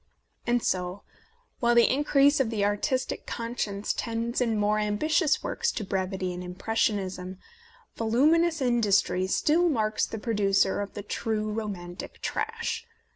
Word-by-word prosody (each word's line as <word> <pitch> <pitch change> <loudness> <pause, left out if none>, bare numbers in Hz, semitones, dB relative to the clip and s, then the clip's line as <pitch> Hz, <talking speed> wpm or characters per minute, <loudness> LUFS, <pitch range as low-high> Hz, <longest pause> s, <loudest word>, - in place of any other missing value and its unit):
And 240 -1 +2
so, 180 +1 -2 0.6
while 240 -2 +3
the 235 - +6
increase 285 0 +4
of 260 -4 +2
the 210 -3 0
artistic 230 +6 -1
conscience 230 -4 -3
tends 230 +2 -2
in 230 -3 +1
more 210 +1 +2
ambitious 305 - +1
works 470 - -1
to 220 - -3
brevity 190 -1 -2
and 180 0 -6
impressionism, 185 -1 -2 0.6
voluminous 305 +8 +3
industry 205 -6 +2
still 330 - +3
marks 215 -6 0
the 225 - -5
producer 205 -3 +1
of 200 - -6
the 205 - -5
true 215 0 -2
romantic 195 -5 -6
trash. 460 +1 -3
220 Hz, 130 wpm, -27 LUFS, 200-255 Hz, 0.6 s, the